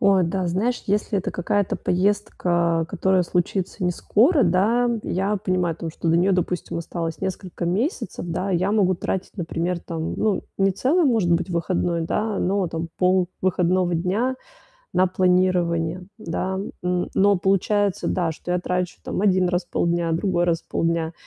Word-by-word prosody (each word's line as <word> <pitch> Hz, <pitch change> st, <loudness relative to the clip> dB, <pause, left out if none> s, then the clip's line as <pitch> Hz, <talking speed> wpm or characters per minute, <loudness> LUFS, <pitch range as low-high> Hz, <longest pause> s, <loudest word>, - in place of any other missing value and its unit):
О 195 Hz, -2 st, +4 dB
да, 180 Hz, +2 st, -1 dB
знаешь, 220 Hz, +8 st, 0 dB
если 205 Hz, 0 st, 0 dB
это -, -, -3 dB
какая-то 195 Hz, +2 st, 0 dB
поездка, 175 Hz, -4 st, +1 dB
которая 190 Hz, -1 st, +2 dB
случится 180 Hz, +2 st, -1 dB
не 180 Hz, -, +2 dB
скоро, 265 Hz, -, +3 dB
да, 215 Hz, +7 st, +3 dB
я 195 Hz, +3 st, 0 dB
понимаю 180 Hz, -3 st, 0 dB
о -, -, -19 dB
том, 165 Hz, -1 st, -4 dB
что 165 Hz, -, -4 dB
до 165 Hz, -, +4 dB
нее, 190 Hz, +3 st, +3 dB
допустим, 180 Hz, -1 st, -1 dB
осталось 165 Hz, -1 st, -4 dB
несколько 185 Hz, -2 st, -4 dB
месяцев, 190 Hz, -, -2 dB
да, 185 Hz, +4 st, -2 dB
и 180 Hz, -, +2 dB
я 190 Hz, +4 st, 0 dB
могу 190 Hz, -4 st, +3 dB
тратить, 190 Hz, +4 st, -4 dB
например, 170 Hz, 0 st, -2 dB
там, 165 Hz, -1 st, -4 dB
ну, 210 Hz, -3 st, 0 dB, 0.2 s
не 195 Hz, 0 st, +3 dB
целый, 305 Hz, -, +2 dB
может 225 Hz, -10 st, +2 dB
быть, 175 Hz, +2 st, 0 dB
выходной, 170 Hz, 0 st, 0 dB
да, 210 Hz, +4 st, -1 dB
но, 190 Hz, 0 st, +1 dB
там, 165 Hz, 0 st, -4 dB
пол 180 Hz, -1 st, +3 dB
выходного 180 Hz, -1 st, +1 dB
дня 200 Hz, +10 st, 0 dB, 0.6 s
на 185 Hz, +1 st, +4 dB
планирование, 180 Hz, -2 st, +1 dB
да. 190 Hz, +1 st, -3 dB, 0.2 s
Н 180 Hz, 0 st, -1 dB
но 200 Hz, 0 st, +4 dB
получается, 195 Hz, +1 st, +1 dB
да, 170 Hz, -3 st, 0 dB
что 175 Hz, +3 st, -5 dB
я 180 Hz, -, +2 dB
трачу, 180 Hz, 0 st, -2 dB
там, -, -, -3 dB
один 185 Hz, -3 st, +3 dB
раз 180 Hz, 0 st, -1 dB
в -, -, -43 dB
полдня, 170 Hz, -1 st, 0 dB
другой 175 Hz, 0 st, +1 dB
раз 165 Hz, -1 st, 0 dB
в -, -, -39 dB
полдня. 165 Hz, 0 st, 0 dB
180 Hz, 170 wpm, -23 LUFS, 170-195 Hz, 0.6 s, О